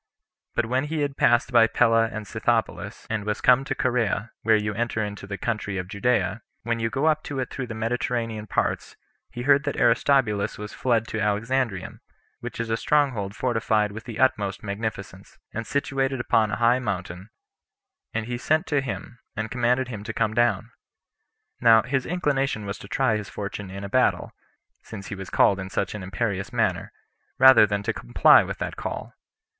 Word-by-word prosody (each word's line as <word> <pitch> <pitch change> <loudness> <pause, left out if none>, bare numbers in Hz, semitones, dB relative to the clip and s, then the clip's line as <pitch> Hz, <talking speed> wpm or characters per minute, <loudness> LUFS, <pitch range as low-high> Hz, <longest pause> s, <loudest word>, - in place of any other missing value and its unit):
But 120 - +1
when 130 +4 0
he 155 0 -2
had 140 -1 -1
passed 120 0 +3
by 115 -2 +6
Pella 115 -1 +3
and 110 -1 -6
Scythopolis, 115 +2 -2
and 110 -1 -2
was 105 0 -2
come 125 +1 +5
to - - -2
Corea, 115 -3 0
where 110 -1 +4
you 105 0 -1
enter 115 0 -1
into 105 -1 -7
the 100 0 -5
country 105 -4 -3
of 90 -1 -4
Judea, 105 0 0 0.2
when 115 0 -1
you 115 0 0
go 135 +6 -1
up 155 -1 +3
to 145 - -5
it 130 - -3
through 130 -2 -4
the 110 - -6
Mediterranean 115 -1 -2
parts, - - -1 0.3
he 120 - -6
heard 140 +1 +4
that 145 - -2
Aristobulus 115 -4 +2
was 105 0 -7
fled 115 -3 0
to 110 - -3
Alexandrium, 110 0 -1 0.4
which - - -7
is 115 -1 -2
a 115 - +1
strong 145 +1 +2
hold 100 -3 -5
fortified 110 -4 0
with 110 +2 -9
the 115 -3 -7
utmost 105 -7 +1
magnificence, 100 -2 -6 0.2
and 115 0 -4
situated 135 -2 -1
upon 110 -2 +2
a 110 - -1
high 120 +2 +3
mountain; 95 -3 -5 0.8
and 110 -1 -2
he 120 +1 -4
sent 155 +6 +1
to 145 -4 +1
him, 120 -2 -6 0.2
and 110 +1 -4
commanded 125 +1 +1
him 105 -4 -6
to - - -4
come 110 -2 0
down. 115 -1 +1 0.9
Now 115 -2 +6
his 130 0 -1
inclination 140 - -1
was 100 +1 -5
to - - -10
try 115 -1 +1
his 105 -2 -7
fortune 100 -1 -6
in 100 +1 -7
a - - -4
battle, - - +1 0.5
since 100 -3 -9
he 105 - -4
was 95 -1 -8
called 100 - +3
in 95 0 -5
such 95 -1 -2
an 105 - -6
imperious 95 +1 -3
manner, - - 0 0.5
rather 130 -4 +8
than 100 0 -2
to - - -1
comply - - +5
with - - -5
that - - -4
call. - - -6
115 Hz, 190 wpm, -25 LUFS, 105-125 Hz, 0.9 s, rather